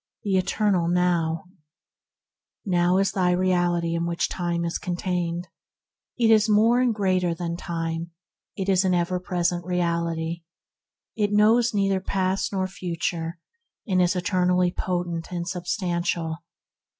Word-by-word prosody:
THE 200 -3 0
ETERNAL 185 -1 +1
NOW 170 -2 +1 1.2
XjOW 180 -1 +2
is 195 - +2
the 180 -2 +2
reality 175 -2 +1
in 170 0 -1
which 170 0 -1
time 170 -1 -2
is 170 - -2
con 180 -2 -3
*• - - -8
^ - - -13
tained. 175 -2 -1 0.7
It 230 -2 +4
is 220 0 +5
more 225 +4 +4
and 250 -1 +3
greater 185 -5 +1
than 170 0 -3
time; 165 -1 -4 0.5
it 190 - -3
is 190 -1 +3
an 185 -1 +2
ever 175 +1 0
present 175 -1 -1
reality. 170 -1 -1 0.7
It 205 -2 0
knows 220 +3 +4
neither 195 -1 +2
past 190 0 -1
nor 190 -2 0
future, 170 -2 -3 0.5
and 185 -3 +2
is 180 +1 +2
eternally 180 -1 +2
potent 175 -2 -3
and 175 -1 -3
substantial. 175 -3 -2
180 Hz, 140 wpm, -25 LUFS, 170-190 Hz, 1.2 s, is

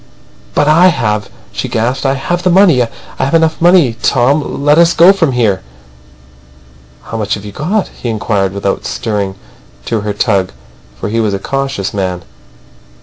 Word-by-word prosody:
"But - - +2
I 165 +4 +5
have," 105 - 0 0.2
she - - -4
gasped. 120 +3 -1
"I 135 - +1
have 175 +6 -2
the 185 - +1
money. 175 -7 +5
I 120 - 0 0.3
have 140 +5 +1
enough 160 0 +1
money. 170 -9 +4
Tom! 140 +2 +1
Let 150 +2 +5
us 170 0 +4
go 175 +4 +7
from 165 -9 0
here." 110 -6 +1 1.4
"How 115 - -6
much 105 -2 -1
have 100 -1 -9
you 105 - -7
got?" 185 - -2
he 120 - -6
inquired, 105 -3 -1
without 100 0 -2
stirring 100 -4 -3 0.5
to 115 -2 -1
her 105 0 -3
tug; 100 -2 0 0.5
for - - -3
he 115 +2 -1
was 105 -3 0
a - - -4
cautious 135 -4 -3
man. 90 -3 -3
120 Hz, 170 wpm, -13 LUFS, 105-160 Hz, 1.4 s, go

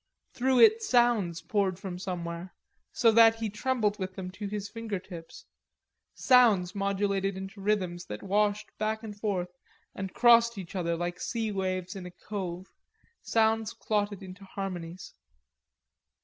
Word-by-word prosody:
Through 260 +1 +3
it 445 0 +7
sounds 240 - +2
poured 195 -4 0
from 185 -2 -6
somewhere, 175 -1 -5 0.4
so 250 -8 +4
that 225 0 +7
he 225 -2 -3
trembled 210 -2 0
with 185 0 -4
them 185 -1 -6
to 205 +2 -6
his 205 0 -4
finger 225 -2 -4
tips, 170 -3 -11 0.7
sounds 215 -8 +4
modulated 200 -1 0
into 195 +1 -8
rhythms 185 -4 -1
that 105 0 -7
washed 205 +1 0
back 220 +1 -1
and 210 -2 -7
forth 200 -4 -2 0.4
and 190 -1 -5
crossed 235 0 +5
each 190 -1 -8
other 170 -2 0
like 175 +1 -3
sea 225 -2 -2
waves 185 -2 -2
in 185 -2 -7
a - - -10 0.2
cove, 185 -3 -5 0.5
sounds 225 0 +1
clotted 205 -3 -2
into 190 +1 -10
harmonies. 185 -3 -6
200 Hz, 145 wpm, -29 LUFS, 185-220 Hz, 0.7 s, it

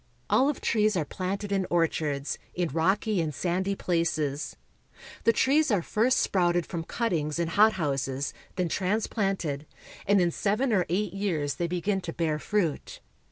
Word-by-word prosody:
Olive 275 +2 +3
trees 215 -3 +2
are 160 - 0
planted 195 +5 -4
in 195 -2 +1
orchards, 155 -4 0 0.2
in 175 -2 0
rocky 190 - +1
and 155 -3 -3
sandy 190 +4 -1
places. 155 -5 -1 0.7
The 230 - +7
trees 285 +6 +3
are 200 -7 +2
first 235 +8 +2
sprouted 175 -2 +2
from 165 -3 -5
cuttings 165 -11 -1
in 170 -1 0
hot 215 +6 +5
houses, 140 -4 -2 0.2
then 180 -2 0
transplanted, 190 - -1 0.4
and 200 0 +5
in 175 -1 +2
seven 215 +8 0
or 185 -4 +2
eight 190 +1 0
years 170 -8 -1
they 175 - -2
begin 190 +3 -1
to 165 -2 -5
bear 155 -3 -1
fruit. 170 -1 -1
180 Hz, 155 wpm, -27 LUFS, 160-205 Hz, 0.7 s, The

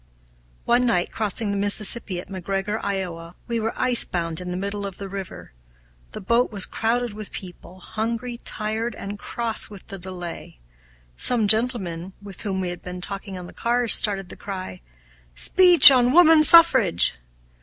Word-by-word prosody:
One 245 +1 +1
night, 180 -6 -1
crossing 215 0 -2
the 200 - -3
Mississippi 205 -1 0
at 180 - -11
McGregor, 195 +3 -5
Iowa, 180 -4 -6
we 235 -1 -4
were 225 +1 -5
icebound 175 -9 +1
in 180 - -8
the 180 - -5
middle 200 +1 -5
of 195 - -10
the 200 - -8
river. 195 - -10 0.6
The - - -7
boat 235 +6 0
was 200 -3 +1
crowded 235 0 -3
with 215 -1 -9
people, 185 0 -11
hungry, 230 +5 -5
tired, 220 +1 -4
and 200 +1 -9
cross 230 0 -2
with 200 -3 -13
the 195 -2 -8
delay. 175 - -9 0.6
Some 230 -4 +2
gentlemen, 195 -6 +1
with 200 -2 -11
whom 190 -3 -4
we 180 - -4
had 175 - -9
been 180 0 -9
talking 195 +1 -6
on 180 - -9
the - - -13
cars, 240 0 +2
started 195 -4 +2
the - - -10
cry, 185 - -9 0.5
"Speech 350 - +8
on 250 -1 +2
woman 325 -2 +5
suffrage!" 260 - +5
200 Hz, 165 wpm, -21 LUFS, 185-235 Hz, 0.6 s, Speech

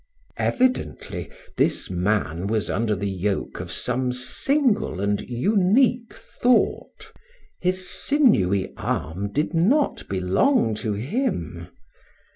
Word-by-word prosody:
Evidently, 255 0 -1 0.3
this - - 0
man 90 -2 0
was 110 0 -1
under 110 +1 0
the 100 +1 -3
yoke 95 +1 -2
of - - -6
some 125 +1 -1
single 220 - 0
and 100 +1 0
unique 210 - +2
thought. 250 0 0 0.5
His 185 0 -1
sinewy 100 - +2
arm 85 +7 -2
did 150 - -2
not 225 - +1
belong 100 - +2
to 105 0 -2
him. 105 - -3
120 Hz, 100 wpm, -23 LUFS, -, 0.5 s, unique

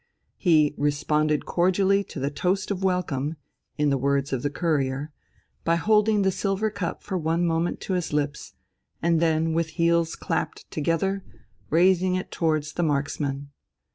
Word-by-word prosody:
He 155 -5 +3
"responded 150 +1 +1
cordially 190 +3 +2
to - - -8
the 140 +2 -1
toast 185 +6 -1
of 190 -1 -3
welcome," 165 -6 0 0.4
in 150 -1 +2
the 135 - +1
words 140 +1 0
of 130 - -1
the 145 - 0
Courier, 145 -2 -1 0.5
by 165 - +2
holding 210 +3 +3
the 190 - +3
silver 200 +3 -1
cup 190 -5 -4
for 190 -3 -2
one 165 +2 +1
moment 165 +1 0
to 190 - -3
his 180 -2 -1
lips, 150 0 -2 0.5
and 165 0 +2
then 160 0 +2
with 165 0 +1
heels 170 -1 +2
clapped - - -3
together, 175 +6 0 0.5
raising 185 +2 +3
it 185 - -4
towards 155 -2 0
the - - -2
marksmen. 140 -1 -2
165 Hz, 155 wpm, -25 LUFS, 150-185 Hz, 0.5 s, He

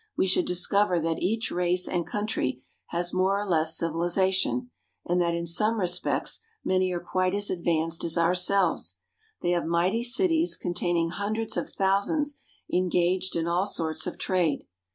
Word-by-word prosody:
we - - +3
should 185 -1 +3
discover 180 +1 +2
that 165 0 -2
each 220 +5 0
race 180 +1 +1
and 175 -2 -2
country 130 -12 -2 0.2
has 175 +1 -2
more 190 +2 +2
or 205 - -3
less 160 -2 +2
civilization, 185 +8 0 0.3
and 175 +1 +1
that 170 -1 +1
in 170 0 -3
some 210 +7 +1
respects 180 -1 0 0.3
many 185 0 +2
are 175 - -2
quite 185 +2 0
as 205 0 0
advanced 165 -2 0
as 165 0 -1
ourselves. 180 +2 +2 0.5
They 175 - +1
have 175 -2 0
mighty 180 +7 +1
cities 330 +6 +2
con 175 - -3
taining 170 -1 0
hundreds 215 +3 -2
of - - -2
thousands 220 +10 0 0.3
engaged 180 +1 +1
in 165 -1 0
all 175 +3 +1
sorts 160 -5 -2
of - - -5
trade. 175 -6 0
180 Hz, 160 wpm, -27 LUFS, 170-200 Hz, 0.5 s, we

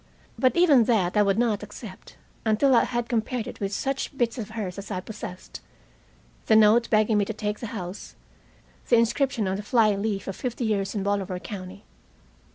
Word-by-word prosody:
But 255 -1 +2
even 295 -9 +6
that 205 -7 +1
I 210 - +5
would 200 -1 +2
not 225 -4 +1
accept, 210 -1 -11 0.3
until 225 +5 +3
I - - +5
had 240 -1 -2
compared 235 0 -1
it - - -9
with 195 -1 -2
such 270 +5 -3
bits 240 +1 0
of 215 -2 -5
hers 195 -3 -4
as 200 - -9
I 190 -3 -2
possessed, 185 -2 -9 0.9
the 220 - +5
note 220 +2 +5
begging 215 -1 +3
me 205 - +2
to 220 - -4
take 210 0 -3
the 230 - -5
house, 190 -3 -7 0.7
the 240 - +6
inscription 230 -1 +1
on 190 +1 -1
the - - -4
fly 215 0 +3
leaf 200 -1 -3
of 195 - -4
"Fifty 245 -1 -3
Years 200 -2 -1
in 200 - -1
Bolivar 200 -2 -1
County." 195 0 -8
215 Hz, 190 wpm, -25 LUFS, 200-235 Hz, 0.9 s, even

